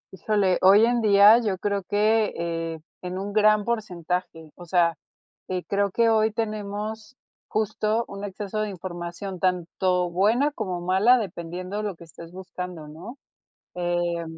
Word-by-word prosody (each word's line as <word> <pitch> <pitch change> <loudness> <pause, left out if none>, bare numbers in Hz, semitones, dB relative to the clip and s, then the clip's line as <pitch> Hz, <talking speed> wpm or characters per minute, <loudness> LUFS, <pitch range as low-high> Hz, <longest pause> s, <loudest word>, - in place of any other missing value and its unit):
Híjole, 195 -1 +1
hoy 200 +4 +7
en 240 0 +1
día 210 +2 +7
yo 205 -5 -1
creo 200 +1 -1
que, 215 +1 +2
eh, 165 -1 -3 0.2
en 180 0 -5
un 200 +1 -5
gran 215 0 +4
porcentaje, 180 -7 -3
o 175 - -11
sea, 170 -1 +2 0.6
que 185 -1 -2
creo 200 0 0
que 230 +4 +2
hoy 220 0 +3
tenemos 215 +1 -4 0.3
justo 215 +1 0
un 200 0 -8
exceso 205 +1 -5
de 215 - -2
información, 180 +1 -6
tanto 180 0 0
buena 225 +11 +2
como 185 -9 -4
mala, 190 +8 +4
dependiendo 185 0 -5
lo 205 -3 -3
que 170 - -14
estés 165 0 -12
buscando, 180 -3 -7
¿no? 180 - -10 0.6
Eh, 175 -1 -1
195 Hz, 145 wpm, -25 LUFS, 175-215 Hz, 0.6 s, hoy